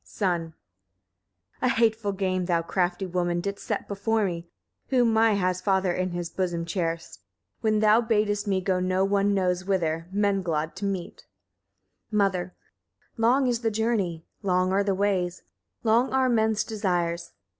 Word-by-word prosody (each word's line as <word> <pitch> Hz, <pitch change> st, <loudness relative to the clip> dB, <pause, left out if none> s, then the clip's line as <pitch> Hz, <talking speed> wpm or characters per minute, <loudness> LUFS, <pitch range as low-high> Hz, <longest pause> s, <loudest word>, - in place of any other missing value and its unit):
Son. 170 Hz, -5 st, -2 dB, 1.0 s
3. -, -, +1 dB
A -, -, +3 dB
hateful 225 Hz, -3 st, +2 dB
game 185 Hz, -2 st, -1 dB
thou, 170 Hz, -2 st, +1 dB
crafty 180 Hz, +2 st, -1 dB
woman, 175 Hz, -1 st, -1 dB
didst 200 Hz, +3 st, -4 dB
set -, -, -2 dB
before 215 Hz, +2 st, 0 dB
me, 170 Hz, -2 st, -4 dB, 0.4 s
whom 245 Hz, -4 st, +3 dB
my 225 Hz, 0 st, +4 dB
has 185 Hz, -2 st, 0 dB
father 190 Hz, -2 st, +1 dB
in 185 Hz, +1 st, -1 dB
his 175 Hz, -1 st, -3 dB
bosom 175 Hz, -3 st, -2 dB
cherished, 165 Hz, -, -3 dB, 0.4 s
when 215 Hz, -1 st, +1 dB
thou 215 Hz, +2 st, +5 dB
badest 210 Hz, -2 st, 0 dB
me 190 Hz, -2 st, +1 dB
go 185 Hz, -1 st, 0 dB
no 185 Hz, +1 st, +1 dB
one 200 Hz, 0 st, +2 dB
knows 180 Hz, -1 st, 0 dB
whither, 165 Hz, -4 st, -1 dB
Menglod 190 Hz, -6 st, 0 dB
to 200 Hz, -, -3 dB
meet. 190 Hz, -3 st, -4 dB, 0.8 s
Mother. 190 Hz, -4 st, 0 dB, 0.6 s
4. -, -, -5 dB
Long 255 Hz, +4 st, +4 dB
is 240 Hz, -2 st, +1 dB
the 225 Hz, -, +1 dB
journey, 210 Hz, -7 st, -1 dB, 0.2 s
long 185 Hz, -2 st, +1 dB
are 195 Hz, +1 st, +2 dB
the 195 Hz, -1 st, 0 dB
ways, 185 Hz, -3 st, 0 dB, 0.4 s
long 235 Hz, +3 st, +3 dB
are 260 Hz, -1 st, +3 dB
men's 220 Hz, -2 st, +2 dB
desires. 175 Hz, -5 st, -2 dB
195 Hz, 155 wpm, -26 LUFS, 180-215 Hz, 1.0 s, thou